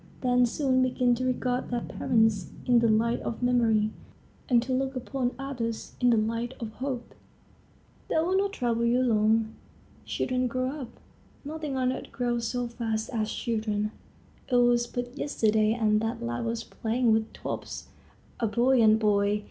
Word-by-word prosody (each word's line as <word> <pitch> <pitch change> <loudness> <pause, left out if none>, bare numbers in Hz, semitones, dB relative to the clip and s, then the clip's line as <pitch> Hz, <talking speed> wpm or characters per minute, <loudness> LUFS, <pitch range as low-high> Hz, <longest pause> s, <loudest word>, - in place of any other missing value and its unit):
They 250 -1 +4
soon 260 +1 +1
begin 250 -1 +2
to 250 +2 -1
regard 255 0 -1
their 240 -1 -1
parents 220 -7 +1 0.2
in 245 -2 +5
the 230 - +3
light 225 +2 +2
of 235 - -5
memory 225 -4 +3 0.6
and 245 -2 +5
to 255 +1 -2
look 265 +1 -1
upon 255 0 -2
others 245 -5 -4
in 245 - +5
the 235 - +4
light 230 +3 -1
of 225 -2 -5
hope." 250 0 -5 0.9
They - - -2
will 340 +4 +2
not 395 +1 +2
trouble 235 - -1
you 245 +2 +3
long. 220 -1 +2 0.5
Children 255 0 -1
grow 255 +1 -1
up; 275 -5 -6 0.6
nothing 300 -2 -4
on 255 0 +1
earth - - -8
grows 240 -2 -1
so 245 +1 -2
fast 225 -1 -3
as 215 -2 -1
children. 215 -2 -1 0.6
It - - +3
was 240 -1 +4
but 245 +1 -5
yesterday 220 -7 +2
and 215 -2 +2
that 225 +1 -2
lad 120 - -2
was 230 0 -2
playing 230 +2 0
with 220 0 0
tops, - - -6 0.5
a 230 - +1
buoyant 235 -1 +4
boy. 205 -1 +2
240 Hz, 165 wpm, -28 LUFS, 220-255 Hz, 0.9 s, in